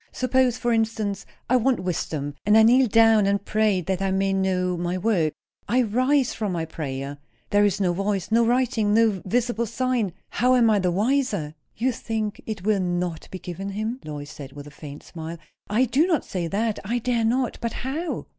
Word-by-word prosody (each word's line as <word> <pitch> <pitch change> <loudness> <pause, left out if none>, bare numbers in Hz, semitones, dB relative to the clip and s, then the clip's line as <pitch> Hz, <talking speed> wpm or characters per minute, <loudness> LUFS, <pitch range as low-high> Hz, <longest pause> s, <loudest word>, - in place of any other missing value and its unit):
Suppose, 255 -1 +1
for 240 -1 0
instance, 220 -3 -1 0.2
I 255 - +4
want 250 -3 +1
wisdom; 155 -5 -3
and 210 +2 +5
I 220 - +7
kneel 250 +3 +5
down 225 -2 +5
and 200 0 0
pray 215 -3 +2
that 190 +2 -2
I 195 - +1
may 195 0 +1
know 185 -1 0
my 175 +1 -2
work. 185 -6 +1 0.4
I 250 +4 +3
rise 255 +4 +2
from 210 -4 -2
my 165 -2 -2
prayer, 140 -3 -5 0.3
there 205 0 +4
is 205 0 +1
no 180 -3 +1
voice, 195 +1 -2
nor 230 +1 +4
writing, 235 -4 +2
nor 220 -5 +3
visible 235 +2 0
sign; 235 -4 -1 0.2
how 255 +1 +2
am 235 -3 +4
I 210 - +3
the 185 -1 +1
wiser?" 205 - 0 0.2
"You 255 +4 +1
think 220 -3 -4
it 210 -4 -5
will 210 -2 +2
not 175 -2 -2
be 185 - -6
given 185 +2 -6
him?" 215 +5 -3
Lois 145 -1 -7
said, 140 -2 -10
with 145 0 -9
a 145 - -11
faint 145 -1 -10
smile. 165 0 -7 0.3
"I 225 +5 +3
do 270 +8 +2
not 330 -5 +1
say 175 -3 -3
that. 215 +4 -1
I 230 +5 -1
dare 240 -1 0
not. 245 +3 0
But 230 -1 -2
how?" 305 +6 -4
210 Hz, 200 wpm, -24 LUFS, 180-235 Hz, 0.4 s, I